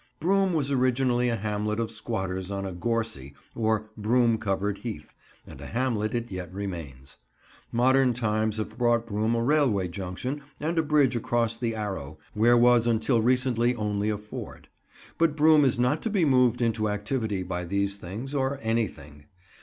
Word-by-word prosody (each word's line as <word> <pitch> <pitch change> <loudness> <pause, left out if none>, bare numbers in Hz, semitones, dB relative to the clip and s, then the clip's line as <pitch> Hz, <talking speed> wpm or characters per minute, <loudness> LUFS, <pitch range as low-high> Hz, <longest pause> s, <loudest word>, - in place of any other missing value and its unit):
Broom 190 +2 +2
was 140 -3 0
originally 125 -1 +2
a 115 - 0
hamlet 105 0 -2
of 115 -1 -2
squatters 95 -5 -4
on 100 -1 -3
a 95 - -4
gorsy, 110 - -3 0.2
or 110 -1 -1
broom 115 +1 +2
covered 100 -1 -1
heath, 105 -11 -7 0.3
and 65 - -12
a 70 - -7
hamlet 115 -3 -1
it 120 -1 -3
yet 90 -2 -6
remains. 85 -10 -7 0.5
Modern 130 +2 +4
times 110 -2 0
have 110 +2 -5
brought 120 -1 +2
Broom 110 +1 0
a 115 - 0
railway 125 -9 +2
junction 95 +10 -5 0.2
and 165 +2 -1
a - - +5
bridge 145 -5 +2
across 115 0 0
the 115 -1 -2
Arrow, 95 -9 -5 0.2
where 120 +3 +4
was 120 -1 +5
until 115 +1 +2
recently 125 0 +2
only 105 -1 -1
a 105 - -1
ford; 105 +1 -9 0.5
but 165 -3 +3
Broom 155 0 +5
is 130 -4 +2
not 125 +6 +1
to 225 - -2
be 195 -6 +2
moved 125 -3 +3
into 110 -2 0
activity 105 -1 -2
by 90 -1 -4
these 100 +2 -1
things, 105 +10 -7
or 135 0 0
anything. 80 -11 -3
115 Hz, 170 wpm, -27 LUFS, 100-125 Hz, 0.5 s, a